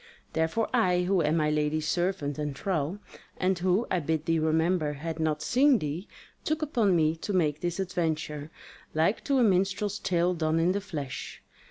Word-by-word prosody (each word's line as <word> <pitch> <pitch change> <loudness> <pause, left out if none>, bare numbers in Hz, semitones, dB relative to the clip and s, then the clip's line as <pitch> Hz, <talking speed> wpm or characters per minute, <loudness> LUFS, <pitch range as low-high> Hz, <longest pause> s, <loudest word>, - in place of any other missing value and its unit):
Therefore 160 +8 0
I, 180 -1 +3
who 185 0 +2
am 155 +1 +2
my 150 -1 +2
lady's 150 0 0
servant 175 -5 -1
and 145 -3 -3
thrall, 170 -1 -1 0.4
and 185 -1 +1
who, 185 +5 +2
I 180 - +2
bid 160 0 -1
thee 165 -1 +2
remember, 160 0 +1
had 160 +3 -5
not 155 -1 0
seen 270 - +4
thee, 155 +2 -4 0.4
took 310 0 -1
upon 230 - +2
me 160 -1 +2
to 200 +5 -4
make 155 -5 +1
this 175 +1 -2
adventure, 160 -5 -2 0.5
like 160 +7 +1
to 275 - +2
a 250 - +4
minstrel's 195 +1 +1
tale 175 0 +1
done 160 -1 0
in 170 +2 +3
the 200 +2 -1
flesh. 150 -9 -6
170 Hz, 180 wpm, -28 LUFS, 155-190 Hz, 0.5 s, seen